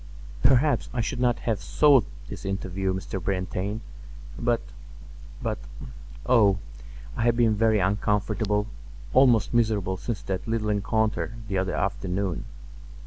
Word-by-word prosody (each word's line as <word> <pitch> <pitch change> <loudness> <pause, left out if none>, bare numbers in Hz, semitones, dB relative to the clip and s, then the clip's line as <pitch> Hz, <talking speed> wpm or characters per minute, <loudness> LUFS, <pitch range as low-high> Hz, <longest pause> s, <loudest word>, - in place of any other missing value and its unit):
"Perhaps 135 0 +3
I - - -1
should 115 - -3
not 125 -1 +1
have 110 -5 -1
sought 140 +4 +4 0.2
this - - -8
interview, 95 0 -2
Mr. 95 0 -4
Brantain; 95 +3 -2 0.5
but—but, - - -5 0.7
oh, 105 -6 +5 0.6
I - - -3
have 120 0 +3
been 115 -2 +4
very 110 0 +3
uncomfortable, 105 +1 0 0.5
almost 125 -6 +4
miserable 105 -5 +1
since 105 +4 -4
that 95 +2 -4
little 110 -1 -1
encounter 110 +2 0
the 95 -3 0
other 95 0 -1
afternoon. 95 -2 -2
105 Hz, 120 wpm, -26 LUFS, 95-115 Hz, 0.7 s, oh